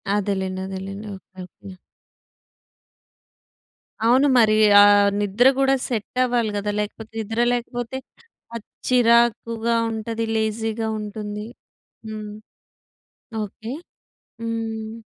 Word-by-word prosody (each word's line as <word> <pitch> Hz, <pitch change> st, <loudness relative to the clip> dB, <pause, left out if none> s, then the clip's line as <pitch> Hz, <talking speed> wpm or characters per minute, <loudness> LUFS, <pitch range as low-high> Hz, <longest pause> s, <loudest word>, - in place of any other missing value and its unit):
అదేలేండి. 190 Hz, -2 st, -2 dB
అదేలేండి. 195 Hz, +2 st, -6 dB
Okay. 190 Hz, 0 st, -18 dB
Okay. 190 Hz, +2 st, -13 dB, 2.3 s
అవును. 255 Hz, +5 st, +5 dB
మరీ 215 Hz, -2 st, +5 dB, 0.3 s
ఆహ్, 205 Hz, 0 st, +6 dB
నిద్ర 205 Hz, +5 st, +3 dB
గూడా 270 Hz, 0 st, +3 dB
సెట్టవ్వాలి 240 Hz, -1 st, 0 dB
గదా! 205 Hz, +1 st, -2 dB
లేకపోతే, 220 Hz, +1 st, -7 dB
నిద్ర 225 Hz, +1 st, -3 dB
లేకపోతే, 245 Hz, +1 st, -4 dB, 0.6 s
అది 230 Hz, -, -7 dB, 0.2 s
చిరాకుగా 235 Hz, -1 st, +3 dB, 0.2 s
ఉంటది, 225 Hz, +1 st, -3 dB
లేజీ‌గా 220 Hz, 0 st, -1 dB
ఉంటుంది. 210 Hz, 0 st, -6 dB, 0.6 s
హ్మ్. 215 Hz, -1 st, -6 dB, 1.1 s
ఓకే. 220 Hz, +3 st, -7 dB, 0.7 s
హ్మ్. 225 Hz, -1 st, -4 dB
220 Hz, 85 wpm, -22 LUFS, 205-230 Hz, 2.3 s, ఆహ్